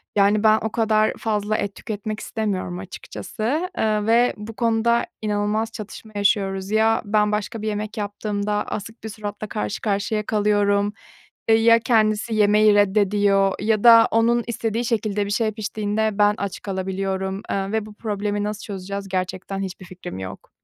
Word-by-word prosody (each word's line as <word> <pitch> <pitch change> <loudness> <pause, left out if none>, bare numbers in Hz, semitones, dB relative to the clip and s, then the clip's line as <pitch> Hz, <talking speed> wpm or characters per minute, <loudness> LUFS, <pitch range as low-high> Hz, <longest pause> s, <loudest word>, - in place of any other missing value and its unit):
Yani, 205 +1 +3
ben 215 0 +6
o 220 - -2
kadar 215 -2 +2
fazla 215 -1 -1
et 200 -1 -3
tüketmek 215 0 -5
istemiyorum 190 -5 -3
açıkçası, 235 - -4
eee, 215 -1 +1
ve 235 +2 +4
bu 215 +2 -8
konuda 235 0 +2 0.2
inanılmaz 210 +1 -1
çatışma 215 0 -9
yaşıyoruz. 195 -1 0
Ya, 220 +1 +3
ben 210 0 +2
başka 210 +1 -3
bir 215 - -3
yemek 210 +1 -3
yaptığımda 205 0 -2
asık 225 +2 -6
bir 220 - -5
suratla 210 0 -6
karşı 210 -1 -3
karşıya 210 +1 -1
kalıyorum. 205 -1 +2 0.6
Eee, 225 - +6
ya, 230 +1 +6
kendisi 220 -1 +1
yemeyi 210 0 +5
reddediyor 200 -1 +3
ya 215 0 +1
da 230 -1 +8
onun 235 +1 +2
istediği 230 0 -2
şekilde 215 -3 0
bir - - -5
şey 215 +1 +1
piştiğinde 215 0 -1
ben 205 0 +4
aç 200 -2 -4
kalabiliyorum, 190 0 -3
eee, 195 0 -1
ve 220 -1 -1
bu 215 - -12
problemi 205 -1 -2
nasıl 210 0 -4
çözeceğiz 200 0 -5
gerçekten 185 +1 -3
hiçbir 185 -1 -6
fikrim 180 - -8
yok. 95 -1 -8
210 Hz, 155 wpm, -22 LUFS, 200-220 Hz, 0.6 s, da